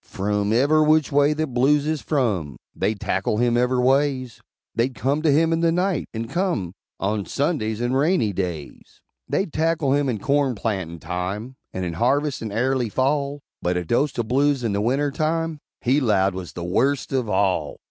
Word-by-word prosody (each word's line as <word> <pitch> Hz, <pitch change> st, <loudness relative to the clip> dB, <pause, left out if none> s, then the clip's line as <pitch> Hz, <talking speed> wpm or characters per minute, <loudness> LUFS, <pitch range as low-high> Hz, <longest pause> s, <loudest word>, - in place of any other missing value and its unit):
Frum 105 Hz, +1 st, -1 dB
ever' 145 Hz, +7 st, +4 dB
which 155 Hz, 0 st, +3 dB
way 145 Hz, +1 st, +4 dB
that 155 Hz, -3 st, -3 dB
blues 140 Hz, +4 st, +3 dB
is 155 Hz, -1 st, -1 dB
from, 100 Hz, -, -1 dB, 0.2 s
They'd 105 Hz, -1 st, -1 dB
tackle 95 Hz, +3 st, -1 dB
him 120 Hz, +1 st, +2 dB
ever' 125 Hz, +1 st, +2 dB
ways; 130 Hz, -1 st, +1 dB, 0.3 s
They'd 125 Hz, +2 st, 0 dB
come 140 Hz, +4 st, 0 dB
to 160 Hz, -, +2 dB
him 160 Hz, +3 st, +3 dB
in 165 Hz, -, +1 dB
the 165 Hz, 0 st, +3 dB
night, 180 Hz, 0 st, 0 dB
and 115 Hz, 0 st, -4 dB
come 170 Hz, -, -1 dB, 0.3 s
On 105 Hz, +1 st, -1 dB
Sundays, 125 Hz, -, -1 dB
and 120 Hz, +2 st, 0 dB
rainy 140 Hz, -, +2 dB
days; 85 Hz, -6 st, -5 dB, 0.3 s
They'd 190 Hz, -5 st, -1 dB
tackle 160 Hz, -3 st, +1 dB
him 145 Hz, -1 st, +1 dB
in 115 Hz, -, -1 dB
corn 135 Hz, +3 st, +1 dB
plantin' 95 Hz, -6 st, -3 dB
time, 95 Hz, +8 st, -4 dB, 0.2 s
And 95 Hz, 0 st, -3 dB
in 85 Hz, -, -3 dB
harvest, 135 Hz, -, +1 dB
and 110 Hz, -2 st, -4 dB
airly 125 Hz, +2 st, 0 dB
Fall, 140 Hz, +4 st, 0 dB, 0.2 s
But 90 Hz, 0 st, 0 dB
a 90 Hz, -, -2 dB
dose't 135 Hz, -, 0 dB
of 120 Hz, -2 st, -1 dB
blues 140 Hz, +1 st, +2 dB
in 110 Hz, -3 st, 0 dB
the 100 Hz, -, 0 dB
wintertime, 155 Hz, +6 st, 0 dB, 0.2 s
He 130 Hz, +4 st, +2 dB
'lowed, 100 Hz, -6 st, +2 dB
was 90 Hz, -1 st, -7 dB
the 85 Hz, -, -6 dB
worst 130 Hz, +11 st, 0 dB
of 125 Hz, -5 st, 0 dB
all! 95 Hz, -7 st, 0 dB
130 Hz, 185 wpm, -23 LUFS, 105-145 Hz, 0.3 s, ever